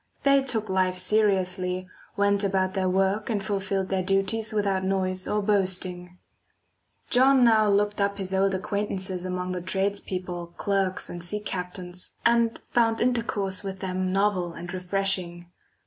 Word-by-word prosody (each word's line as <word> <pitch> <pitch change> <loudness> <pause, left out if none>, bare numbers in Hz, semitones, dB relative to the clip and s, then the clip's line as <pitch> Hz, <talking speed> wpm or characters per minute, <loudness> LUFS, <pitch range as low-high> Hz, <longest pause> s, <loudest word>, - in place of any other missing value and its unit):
They 275 -1 +5
took 230 -5 0
life 185 -1 +1
seriously, 185 -2 +1 0.3
went 200 0 +3
about 190 -1 +1
their 190 -1 0
work 195 +4 +1
and 205 -3 -1
fulfilled 195 -1 -1
their 190 -1 0
duties 195 +4 0
without 200 -3 0
noise 185 -1 -1
or 210 0 0
boasting. 185 -3 0 0.9
John 260 +1 +5
now 220 -3 +5
looked 205 +1 +1
up 200 0 0
his 190 -1 -3
old 195 0 +2
acquaintances 190 -2 -2
among 180 0 -3
the 180 -1 -3
tradespeople, 185 -2 -3
clerks, 195 -2 0
and 175 -1 -6
sea 210 +5 0
captains, 180 -2 -5
and 235 -1 +3
found 225 -1 +2
intercourse 215 -6 0
with 195 -1 -5
them 185 -1 -2
novel 190 -3 +1
and 175 +2 -8
refreshing. 180 -2 -2
195 Hz, 145 wpm, -26 LUFS, 185-205 Hz, 0.9 s, They